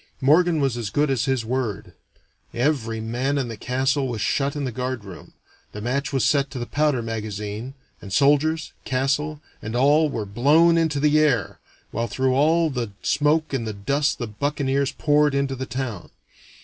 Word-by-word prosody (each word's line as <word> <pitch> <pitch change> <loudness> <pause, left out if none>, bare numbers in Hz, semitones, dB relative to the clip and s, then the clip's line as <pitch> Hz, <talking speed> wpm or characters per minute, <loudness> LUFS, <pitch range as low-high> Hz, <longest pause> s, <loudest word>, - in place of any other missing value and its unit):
Morgan 160 +4 +4
was 135 -4 0
as 115 -4 -3
good 145 +7 +1
as 135 0 0
his 130 -4 0
word: 110 -7 -3 0.6
every 120 -4 0
man 125 +6 -1
in 130 -4 -1
the 115 - -5
castle 130 +4 0
was 120 -3 -4
shut 140 +7 0
in 145 - -3
the 130 - -2
guard 125 -2 -4
room, 95 -2 -11 0.4
the 105 - -6
match 130 +6 -2
was 135 -3 +1
set 140 -2 +2
to - - -8
the 120 - -3
powder 145 -3 0
magazine, 110 +2 -5 0.3
and 100 - -10
soldiers, 150 +7 +2
castle, 140 +4 -1 0.2
and 110 +2 -5
all 145 +5 +4
were 115 -6 -3
blown 145 +11 +4
into 160 -3 +1
the 150 +1 +3
air, 125 - +1 0.3
while 115 0 -2
through 130 +1 0
all 160 +4 +3
the 120 -6 -4
smoke 150 +1 +1
and 115 -4 -2
the 110 - -3
dust 140 +9 0
the 120 - -3
buccaneers 140 +4 -1
poured 150 -1 +2
into 140 -1 0
the 130 0 -5
town. 120 -9 -5
135 Hz, 180 wpm, -23 LUFS, 115-145 Hz, 0.6 s, Morgan